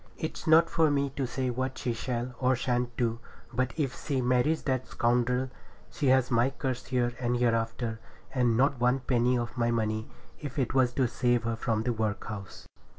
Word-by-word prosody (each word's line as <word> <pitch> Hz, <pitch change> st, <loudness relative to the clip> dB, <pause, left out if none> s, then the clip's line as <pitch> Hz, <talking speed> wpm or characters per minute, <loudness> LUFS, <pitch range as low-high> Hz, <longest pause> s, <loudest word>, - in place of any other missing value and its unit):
It's 160 Hz, -, -5 dB
not 165 Hz, +1 st, +7 dB
for 160 Hz, -2 st, +3 dB
me 140 Hz, -1 st, +1 dB
to 135 Hz, -1 st, -2 dB
say 130 Hz, +1 st, -2 dB
what 130 Hz, +1 st, -3 dB
she 120 Hz, -, -1 dB
shall 120 Hz, +1 st, -3 dB
or 130 Hz, 0 st, +3 dB
shan't 125 Hz, -1 st, -1 dB
do, 115 Hz, -1 st, 0 dB, 0.3 s
but 130 Hz, +2 st, 0 dB
if 140 Hz, -4 st, -1 dB
she 140 Hz, -3 st, 0 dB
marries 125 Hz, +5 st, +2 dB
that 130 Hz, -2 st, -1 dB
scoundrel, 125 Hz, +2 st, +1 dB, 0.4 s
she 150 Hz, -5 st, -1 dB
has 130 Hz, -1 st, +4 dB
my 120 Hz, +2 st, +3 dB
curse 130 Hz, -2 st, -4 dB
here 120 Hz, -1 st, 0 dB
and 120 Hz, -1 st, 0 dB
hereafter, 115 Hz, -1 st, 0 dB, 0.3 s
and 120 Hz, -3 st, +2 dB
not 135 Hz, 0 st, +2 dB
one 125 Hz, +2 st, +2 dB
penny 125 Hz, -1 st, +2 dB
of 120 Hz, 0 st, -3 dB
my 120 Hz, -1 st, +1 dB
money, 110 Hz, -1 st, -1 dB, 0.3 s
if 145 Hz, -1 st, -7 dB
it 130 Hz, -4 st, 0 dB
was 130 Hz, -2 st, +3 dB
to 130 Hz, -1 st, +2 dB
save 120 Hz, 0 st, +1 dB
her 115 Hz, 0 st, -1 dB
from 110 Hz, -1 st, -1 dB
the 120 Hz, 0 st, 0 dB
workhouse.' 105 Hz, -2 st, -4 dB
125 Hz, 190 wpm, -29 LUFS, 120-130 Hz, 0.4 s, not